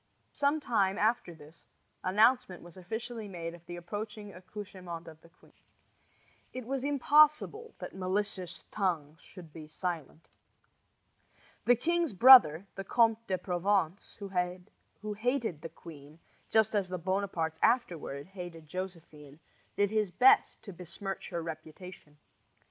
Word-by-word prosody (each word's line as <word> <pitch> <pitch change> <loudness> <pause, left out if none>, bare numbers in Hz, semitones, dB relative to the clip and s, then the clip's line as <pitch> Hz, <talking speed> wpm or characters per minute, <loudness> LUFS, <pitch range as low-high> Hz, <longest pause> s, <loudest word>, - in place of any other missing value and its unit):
Some 290 +2 +1
time 200 -8 +1
after 215 -5 0
this 155 +1 -17 0.4
announcement 210 0 +3
was 175 -1 -13
officially 220 +4 -6
made 170 -3 -6
of 170 -1 -13
the 175 - -6
approaching 205 +3 -7
accouchement 185 -3 -9
of 160 -1 -12
the 170 - -19
queen. 170 - -24 1.0
It 255 -2 -6
was 265 +1 -3
impossible 300 - +3
that - - -8
malicious 190 -1 -3
tongues 165 -7 -2
should 170 -5 -14
be 155 -2 -10
silent. 165 -1 -5 1.4
The 245 - +6
king's 340 +2 0
brother, 200 - +8
the 195 - -6
Comte 230 +2 +2
de 185 - 0
Provence, 180 0 -1
who 190 +2 -5
hated 225 - -1
the 165 - -6
queen, 155 -2 -13 0.3
just 220 -1 +3
as 200 -3 0
the 185 - -3
Bonapartes 175 -3 -2
afterward 170 - 0
hated 175 -4 -9
Josephine, 160 -5 -8 0.4
did 205 0 +1
his 215 -2 +1
best 250 +8 +4
to 200 - -9
besmirch 185 +3 -7
her 170 -2 -4
reputation. 155 -1 -9
185 Hz, 130 wpm, -31 LUFS, 170-220 Hz, 1.4 s, brother